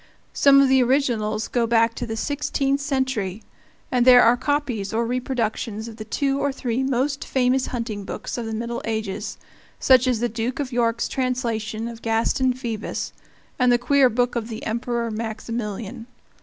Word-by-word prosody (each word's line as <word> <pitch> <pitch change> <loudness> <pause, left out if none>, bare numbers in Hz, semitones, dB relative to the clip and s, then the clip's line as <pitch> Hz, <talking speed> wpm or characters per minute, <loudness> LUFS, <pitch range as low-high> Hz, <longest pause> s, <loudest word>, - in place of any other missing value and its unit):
Some 275 -1 +6
of 275 - +5
the 265 0 +4
originals 235 -5 +1
go 235 -2 0
back 230 0 +3
to - - -5
the 225 0 -4
sixteenth 285 +1 -1
century, 260 -8 -2 0.5
and 250 -2 +3
there 250 -1 +8
are 235 +1 +6
copies 255 -6 -1
or 230 +1 +1
reproductions 230 -3 -2
of 225 -1 -9
the 215 - -6
two 275 +5 -1
or 285 - +1
three 255 -2 -2
most 270 +2 0
famous 260 0 +1
hunting 230 -4 -4
books - - -5
of 235 -2 -4
the 220 - -3
Middle 235 +1 -3
Ages, 220 -3 -3 0.4
such 255 -1 +5
as 245 -3 +1
the 240 - +1
Duke 235 +3 -3
of 275 -2 -3
York's 235 -1 +1
translation 235 -4 -2
of 230 -1 -8
Gaston 230 +3 +1
Phoebus, 235 -4 -4 0.5
and 250 -1 +4
the 240 - +5
queer 270 +1 +4
book 245 +2 0
of 230 -2 -2
the 225 -2 -7
Emperor 235 0 -2
Maximilian. 225 0 -5
240 Hz, 170 wpm, -23 LUFS, 225-260 Hz, 0.5 s, there